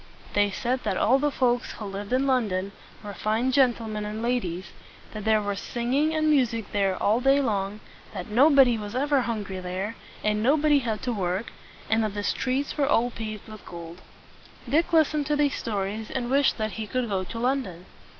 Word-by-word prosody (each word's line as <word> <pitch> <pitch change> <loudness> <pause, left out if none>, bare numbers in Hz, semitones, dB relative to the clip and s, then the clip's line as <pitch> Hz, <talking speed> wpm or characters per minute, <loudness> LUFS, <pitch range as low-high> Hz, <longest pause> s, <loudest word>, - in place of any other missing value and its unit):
They 205 0 +3
said 240 +6 -1
that - - -1
all 260 +5 +4
the 295 +1 +2
folks 245 -3 0
who 215 - -7
lived 200 +1 -6
in 260 +2 +2
London 205 -8 0 0.3
were 205 -1 -6
fine 220 +6 0
gen 260 -3 +4
tle 230 - -8
men 215 -1 -4
and 210 +1 -4
ladies; 190 -8 -2 0.4
that 210 -1 -6
there 215 -1 +3
was 205 -1 -2
singing 270 +9 0
and 310 0 +1
music 240 -8 +1
there 195 -2 +1
all 215 +3 +2
day 270 +2 +4
long; 210 -5 -1 0.3
that - - -6
nobody 255 0 +5
was 210 +2 -6
ever 280 +1 +2
hungry 210 -5 -3
there, 185 +4 -4 0.3
and 210 0 +1
nobody 295 +4 +4
had 225 -4 -3
to 245 - -1
work; 190 +1 -2 0.4
and 225 0 +2
that 210 -1 -2
the 205 - -3
streets 265 +7 -1
were 280 - +3
all 245 -1 +2
paved 215 -2 -6
with 215 -1 -11
gold. 170 +1 -9 0.7
Dick 310 +8 +2
listened 305 -3 +3
to 300 - +1
these 290 -1 +2
stories, 210 0 -3
and 245 -1 -3
wished 280 +1 +3
that 215 -1 -2
he 215 - -4
could 255 +2 -1
go 195 -3 -1
to 185 +5 -7
London. 230 -8 -1
225 Hz, 200 wpm, -26 LUFS, 205-265 Hz, 0.7 s, nobody